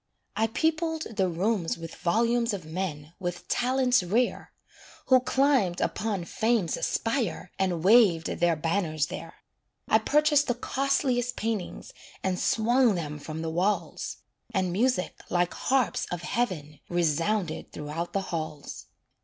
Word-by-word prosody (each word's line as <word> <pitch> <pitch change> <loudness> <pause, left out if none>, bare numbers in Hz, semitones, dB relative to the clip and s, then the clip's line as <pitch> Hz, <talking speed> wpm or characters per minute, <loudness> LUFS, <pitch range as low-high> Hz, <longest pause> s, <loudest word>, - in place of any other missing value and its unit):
I 220 +1 +2
peopled 320 +5 0
the 190 -3 +2
rooms 180 0 0
with 165 -1 -8
volumes 230 +5 +1
Of 180 -5 -8
men 160 -2 -4
with 175 -2 -4
talents 250 -1 +2
rare, 220 +8 0 0.6
Who 260 -1 +7
climbed 255 -8 +2
upon 205 -5 -1
Fame's 220 -4 0
spire 225 -7 -1
And 180 -4 0
waved 195 -6 +6
their 170 -1 +1
banners 160 -1 0
there. - - -7 0.5
I 220 - +5
purchased 295 +4 +3
the 245 - +1
costliest 250 -1 0
paintings, 220 -4 -4 0.3
And 185 -1 0
swung 235 0 +3
them 150 -3 -4
from 155 +2 -6
the 160 - -2
walls; 185 +5 -1 0.3
And 185 -3 0
music, 235 -1 0
like 175 0 +1
harps 260 -4 0
of 175 -1 -4
heaven, 165 - -2
Resounded 175 +2 0
throughout 155 +3 -5
the 195 - 0
halls. 155 -3 -5
195 Hz, 130 wpm, -27 LUFS, 170-245 Hz, 0.6 s, Who